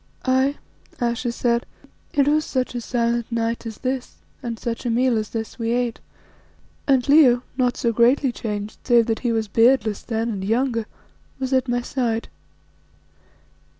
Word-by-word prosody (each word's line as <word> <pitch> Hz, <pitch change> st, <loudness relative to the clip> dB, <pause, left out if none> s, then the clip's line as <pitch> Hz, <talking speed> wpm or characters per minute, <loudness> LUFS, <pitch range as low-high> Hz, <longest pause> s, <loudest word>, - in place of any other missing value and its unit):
"Aye," 260 Hz, +2 st, +2 dB, 0.4 s
Ayesha 240 Hz, 0 st, -1 dB
said, 235 Hz, 0 st, 0 dB, 0.4 s
"it 280 Hz, -1 st, +2 dB
was 305 Hz, +1 st, +3 dB
such 255 Hz, -4 st, -2 dB
a 240 Hz, -, -3 dB
silent 235 Hz, 0 st, -1 dB
night 230 Hz, 0 st, -1 dB
as 220 Hz, -, -7 dB
this 255 Hz, -1 st, -3 dB, 0.3 s
and 235 Hz, -3 st, -4 dB
such 230 Hz, +1 st, -4 dB
a 245 Hz, -, -1 dB
meal 245 Hz, +1 st, +2 dB
as 215 Hz, -1 st, -1 dB
this 225 Hz, +1 st, -5 dB
we 230 Hz, 0 st, 0 dB
ate, 245 Hz, -1 st, -1 dB, 0.9 s
and 265 Hz, -2 st, +3 dB
Leo, 270 Hz, -4 st, +6 dB
not 250 Hz, -2 st, +1 dB
so 235 Hz, -1 st, 0 dB
greatly 250 Hz, +4 st, +3 dB
changed, 210 Hz, -3 st, -5 dB
save 240 Hz, -2 st, +4 dB
that 225 Hz, -1 st, -1 dB
he 240 Hz, -, 0 dB
was 225 Hz, -1 st, 0 dB
beardless 225 Hz, 0 st, +3 dB
then 225 Hz, 0 st, -2 dB
and 200 Hz, -4 st, -3 dB
younger, 230 Hz, +1 st, 0 dB, 0.5 s
was 265 Hz, 0 st, -2 dB
at 260 Hz, 0 st, +2 dB
my 245 Hz, 0 st, 0 dB
side. 235 Hz, -3 st, -2 dB
240 Hz, 160 wpm, -22 LUFS, 230-255 Hz, 0.9 s, Leo